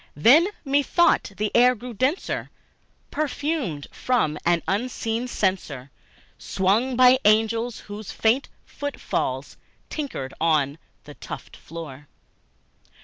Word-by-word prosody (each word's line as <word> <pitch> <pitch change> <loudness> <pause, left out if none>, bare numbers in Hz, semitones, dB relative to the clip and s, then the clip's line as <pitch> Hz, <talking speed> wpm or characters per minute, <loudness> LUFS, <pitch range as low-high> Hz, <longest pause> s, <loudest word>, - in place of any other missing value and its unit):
Then 270 - +6 0.2
methought 285 - +2
the 210 0 -1
air 250 +1 +5
grew 245 +2 -8
denser, 260 - -1 0.6
perfumed 285 - -2
from 220 -12 0
an 170 -1 +3
unseen 230 +2 -1
censer 170 - -2 0.5
Swung 215 +7 +1
by 255 +1 +6
seraphim, 225 +2 +3 0.2
whose 205 0 -7 0.5
footfalls 140 - -4 0.3
twinkled 260 - -4
on 155 -2 +2 0.2
the - - -11
tufted - - -9
floor. 150 -3 -9
220 Hz, 95 wpm, -24 LUFS, 165-255 Hz, 0.6 s, Then